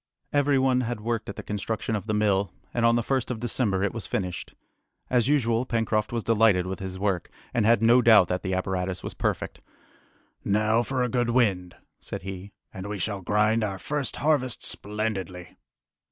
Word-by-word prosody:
Every 145 -1 +3
one 130 -1 +3
had 120 -2 -3
worked 110 0 -3
at 100 - -6
the - - -7
construction 110 +2 -3
of 105 +1 -4
the 110 - 0
mill, 100 -3 +1 0.2
and 120 -1 +3
on 115 - +4
the 120 - +1
1st 130 0 -1
of 120 -3 -3
December 110 -5 0
it 100 - 0
was 110 -7 -5
finished. 90 -3 -4 0.6
As 125 -2 +3
usual, 120 -5 +2
Pencroft 115 -2 0
was 115 -2 -2
delighted 110 -5 +3
with 95 -1 -4
his 95 -1 -5
work, 95 -3 -1 0.2
and 110 -3 +2
had 115 -1 +4
no 120 +2 +6
doubt 110 -6 +7
that 90 0 -1
the 95 -1 -2
apparatus 95 -1 -2
was - - -5
perfect. - - -2 0.8
"Now 110 +3 +2
for 130 +1 -1
a - - +1
good 120 0 0
wind," 100 -8 +1 0.2
said - - -6
he, 95 +1 -7 0.2
"and 95 +1 -6
we 105 - -3
shall 100 +1 -3
grind 105 +4 +2
our 100 -2 -2
first 145 +6 -3
harvest 140 -4 0
splendidly!" 95 -4 -4
110 Hz, 190 wpm, -26 LUFS, 95-120 Hz, 0.8 s, doubt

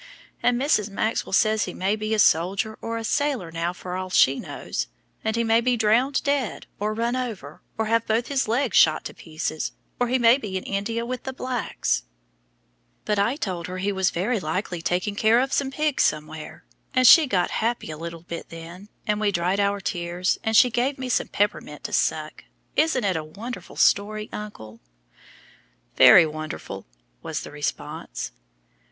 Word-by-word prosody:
And 245 0 +2
Mrs. 235 -7 +2
Maxwell 215 +3 -1
says 215 +2 +3
he 180 - -7
may 195 +3 0
be 215 +1 -1
a - - -1
soldier 195 +3 +2
or 230 0 -3
a 225 - -4
sailor 260 - -1
now 165 +1 -1
for 180 0 -7
all 185 0 -4
she 135 -6 +4
knows, - - -4 0.4
and 220 - 0
he 230 - +1
may 225 0 +3
be 245 0 +1
drownded 235 +6 +2
dead, 280 -6 -1
or 210 +1 -1
run 235 +2 0
over, 215 - -5 0.2
or 220 - 0
have 230 +1 +1
both 225 +2 +1
his 270 -3 0
legs 240 +1 0
shot 155 -1 +5
to - - -6
pieces, 155 -1 -4 0.3
or 245 - +2
he 255 +2 +2
may 240 +2 +5
be 200 -6 -4
in 185 - -5
India 225 +4 -2
with 250 0 -4
the 265 - -5
blacks; 245 - -1 1.0
but 210 -1 +1
I 230 +6 +2
told 185 - -4
her 185 0 -5
he 195 +2 -1
was 190 -2 +1
very 210 +7 -1
likely 175 +1 -3
taking 180 +4 -1
care 220 +3 +4
of 265 +2 0
some 275 -1 +1
pigs 300 +1 0
somewhere, 155 0 -2 0.3
and 255 0 +4
she 310 +4 +9
got 185 -7 +1
happy 230 -7 -1
a - - -5
little 165 +1 -7
bit 170 -1 -7
then, 170 +5 -10 0.2
and 210 0 0
we 210 -1 +2
dried 180 +2 0
our 200 0 +1
tears, 175 -1 -1
and 220 -1 +2
she 250 +3 +6
gave 255 +4 0
me 260 -1 -5
some - - +1
peppermint 205 +1 -2
to - - -5
suck. - - -1 0.3
Isn't 305 -6 +2
it 190 -3 +1
a 160 - -2
wonderful 215 +11 -8
story, 215 +1 +2
uncle?" 115 - -8 1.2
"Very 170 - +9
wonderful," 155 - -6 0.3
was - - -4
the - - -9
response. - - -5
210 Hz, 185 wpm, -24 LUFS, 180-240 Hz, 1.2 s, she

